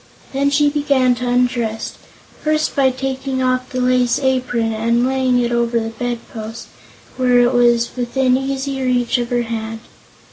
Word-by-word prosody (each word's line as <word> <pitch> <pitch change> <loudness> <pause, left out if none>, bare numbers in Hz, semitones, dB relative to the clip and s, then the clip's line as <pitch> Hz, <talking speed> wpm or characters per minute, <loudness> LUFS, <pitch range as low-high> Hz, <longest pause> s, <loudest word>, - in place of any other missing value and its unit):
Then 280 +1 +1
she 290 +1 +3
began 280 -3 +2
to 245 +1 -4
undress, 245 -3 0 0.5
first 310 0 0
taking 265 0 0
off 255 0 0
the 255 - -3
lace 250 -1 +2
apron 250 -4 0
and 230 +2 +1
laying 260 -1 +1
it 240 -1 0
over 235 0 +1
the 225 0 -3
bedpost, 230 -1 -6 0.5
where 250 -1 +3
it 245 +1 +3
was 240 -1 +3
within 255 +1 +1
easy 270 0 -2
reach 250 -1 +1
of 240 -1 -3
her 240 -1 0
hand. 225 -1 -5
250 Hz, 150 wpm, -18 LUFS, 235-265 Hz, 0.5 s, she